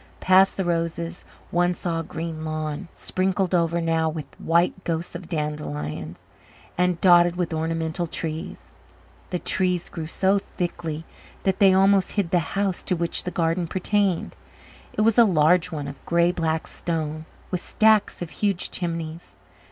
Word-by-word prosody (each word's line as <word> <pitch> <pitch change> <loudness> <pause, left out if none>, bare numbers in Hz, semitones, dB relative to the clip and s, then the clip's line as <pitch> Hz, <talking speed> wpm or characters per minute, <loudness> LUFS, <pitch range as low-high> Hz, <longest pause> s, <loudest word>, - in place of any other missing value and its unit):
Past 190 +1 +5
the 190 - 0
roses 170 0 -2 0.3
one 175 +1 +2
saw 170 -2 -2
a - - -3
green 160 0 -5
lawn, 155 +2 -3
sprinkled 185 0 -1
over 170 -1 +2
now 165 -1 +1
with 155 -1 -6
the - - -19
white 170 +3 +2
ghosts 165 0 -3
of 175 -1 -8
dandelions, 90 - -4 0.5
and 180 -1 +1
dotted 175 -1 +6
with 175 -2 -2
ornamental 165 +2 -1
trees. 160 +1 -5 0.6
The 180 - -1
trees 180 0 0
grew 160 -2 -5
so 190 +4 +2
thickly 170 -4 -4 0.4
that 190 +1 +1
they 195 -2 +7
almost 195 0 +4
hid 195 -5 -1
the 180 - +4 0.2
house 195 -2 0
to 185 - -1
which 170 0 -2
the - - -1
garden 170 0 0
pertained. 190 +1 0 0.6
It - - -1
was 225 +2 +4
a - - +10
large 175 -3 +3
one 145 -3 -4
of 140 -1 -9
grey 170 +1 +3
black 160 -2 -1
stone, 155 -2 -4 0.2
with 180 -2 -1
stacks 215 -4 +3
of 165 - -8
huge 195 +3 -1
chimneys. 165 -1 -5
170 Hz, 160 wpm, -24 LUFS, 160-185 Hz, 0.6 s, a